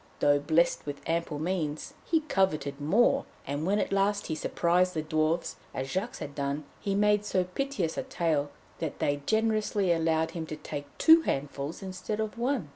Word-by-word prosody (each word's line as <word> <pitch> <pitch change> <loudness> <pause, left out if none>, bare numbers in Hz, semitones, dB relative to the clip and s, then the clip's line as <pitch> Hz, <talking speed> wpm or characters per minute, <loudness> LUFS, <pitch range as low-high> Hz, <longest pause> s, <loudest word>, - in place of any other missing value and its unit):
Though 145 0 +4
blessed 160 +2 +2
with 145 0 -4
ample 165 -2 -1
means, 155 -2 -2
he 325 -1 +2
coveted 155 - 0
more, 195 +12 +3 0.2
and 145 +4 -2
when 200 +2 +3
at - - -1
last 200 +1 +1
he - - -2
surprised 180 +3 +1
the 155 - -1
Dwarfs 155 +2 0 0.2
as 130 +1 -3
Jacques 195 +6 -2
had 140 - -6
done, 140 +1 -2 0.2
he 200 -1 -1
made 210 0 +3
so 185 -3 +1
piteous 180 -3 -2
a - - -2
tale 155 -4 0 0.3
that 160 -4 -3
they 145 0 0
generously 215 -3 +2
allowed 160 -1 +1
him 165 -2 -5
to 155 - -5
take 145 -1 -6
two 325 0 +7
handfuls 145 - -3
instead 190 +3 -4
of 220 -1 -2
one. 240 - 0
170 Hz, 180 wpm, -29 LUFS, 150-205 Hz, 0.3 s, two